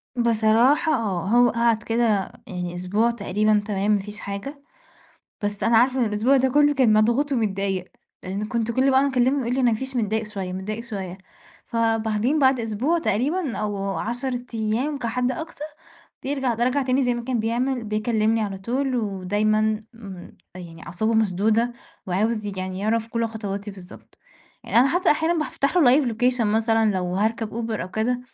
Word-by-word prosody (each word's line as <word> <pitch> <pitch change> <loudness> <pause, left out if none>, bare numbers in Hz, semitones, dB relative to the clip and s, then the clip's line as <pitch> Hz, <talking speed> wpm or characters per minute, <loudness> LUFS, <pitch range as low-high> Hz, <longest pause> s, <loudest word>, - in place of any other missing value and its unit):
بصراحة 235 +7 +3
آه، 195 -8 -1
هو 240 +3 +5
قَعد 230 -1 +1
كده 225 -4 +1 0.2
يعني 180 -1 -5
أسبوع 205 +6 +1
تقريبًا 210 -1 +1
تمام 205 0 0
ما 205 - +3
فيش 210 +1 -8
حاجة، 235 +9 -6 0.8
بس 205 0 -3
أنا 230 - +4
عارفة 255 +2 +3
إن 240 - +4
الأسبوع 220 +6 +2
ده 265 0 +3
كُلّه 290 +2 +4
كان 255 -5 +4
مضغوط 235 +7 +2
ومتضايق، 195 -5 -1 0.4
لإن 195 +3 -3
كنت 235 -1 -1
كل 260 +3 +3
بَقي 265 0 +4
ما 280 - +2
أكلّمه 260 +2 +2
يقول 240 +1 -1
لي: 265 - 0
"ما 235 -2 +4
فيش 265 +3 -5
متضايق 220 -1 0
شوية، 195 -4 -5
متضايق 210 +5 -5
شوية". 195 -5 -6 0.5
فبعدين 225 +3 0
بَعد 265 -3 +3
أسبوع 235 +10 0
تقريبًا 295 - -1
أو 200 -2 -2
10 245 +2 -3
أيام 225 +7 -1
كحد 250 +1 -1
أقصى 315 0 -6 0.6
بيرجع، 265 -3 -1
ده 235 - 0
رجع 265 +3 +1
تاني 260 +1 +1
زي 245 -1 +1
ما 240 - -4
كان 255 -1 -1
بيعمل، 240 +2 -1
بيكلّمني 215 +1 0
على 195 -2 -4
طول 255 +6 -1
ودايمًا 210 0 0 0.3
م 195 -6 -10 0.3
يعني 170 -3 -10
أعصابه 220 +5 -1
مشدودة، 220 +3 +2 0.3
وعاوز 215 +4 0
يج 200 -2 -5
يعني 185 0 -4
يعرف 225 +2 0
كل 230 0 -1
خطواتي 205 -2 -5
بالضبط. 185 -2 -14 0.5
يعني - - -2
أنا 260 - +5
حتى 355 +5 +2
أحيانًا 325 +3 +2
بافتح 305 0 -1
له 280 -4 +6
live 265 - -1
location 250 +2 +1
مثلًا 225 0 +2
لو 180 -1 -2
هاركب 220 +3 0
Uber 225 -1 -3
أو 180 - -5
كده، 240 +5 -1
225 Hz, 175 wpm, -23 LUFS, 205-250 Hz, 0.8 s, له